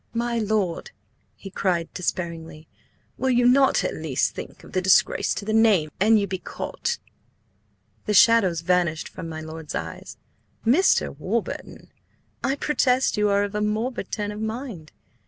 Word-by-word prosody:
"My 235 0 0
lord!" 210 -5 -1 0.5
he 195 - -10
cried 175 -4 -1
despairingly, 165 -3 -4 0.5
"Will 265 - +1
you 245 -1 +3
not 270 +2 +4
at - - -1
least - - -1
think - - -9
of - - -14
the 185 - 0
disgrace 190 0 +3
to 200 - -5
the 215 - -1
name 210 -9 +4
an 220 +3 +5
you 205 - +1
be 190 -1 -4
caught?" 475 - -4 1.1
The 210 - +1
shadows 195 -6 +5
vanished 170 -2 +1
from 165 - -8
my 160 0 -6
lord's 160 -1 -7
eyes. 80 -1 -6 0.5
"Mr. 290 +12 +3
Warburton, - - -4 0.5
I 270 - +1
protest 265 -3 +1
you 210 -1 +2
are 200 0 +2
of 205 0 -4
a 210 - -1
morbid 215 +1 -2
turn 205 -1 -2
of 210 +1 -7
mind! 220 - -5
205 Hz, 155 wpm, -24 LUFS, 170-230 Hz, 1.1 s, an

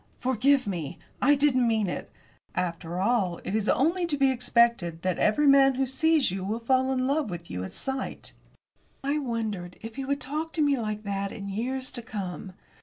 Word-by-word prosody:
"Forgive 260 +2 +2
me! 170 -8 -4 0.2
I 290 +3 +5
didn't 270 -4 +3
mean 220 -3 +1
it! 175 - -5 0.4
After 175 -1 -2
all, 195 -4 +1
it - - -4
is 215 -1 0
only 340 +7 +2
to 295 -3 -1
be 270 -1 +4
expected 235 -9 +2
that 185 -1 0
every 255 +8 +3
man 275 -1 +6
who 270 +1 +1
sees 305 - +2
you 190 0 -3
will 210 +4 -2
fall 260 +2 +2
in 255 -1 0
love 280 -2 0
with 170 -2 -7
you 90 +1 -3
at 95 - -6
sight." 265 -1 -5 0.7
I 285 +2 0
wondered 220 -9 -3
if 225 +3 -9
he 270 - -3
would 280 +1 -1
talk 305 +4 -4
to 320 - 0
me 285 -1 +3
like 215 -3 -3
that 200 -1 -2
in 200 -3 -6
years 255 +6 -3
to 240 - -6
come. 195 -3 -6
235 Hz, 195 wpm, -27 LUFS, 195-270 Hz, 0.7 s, man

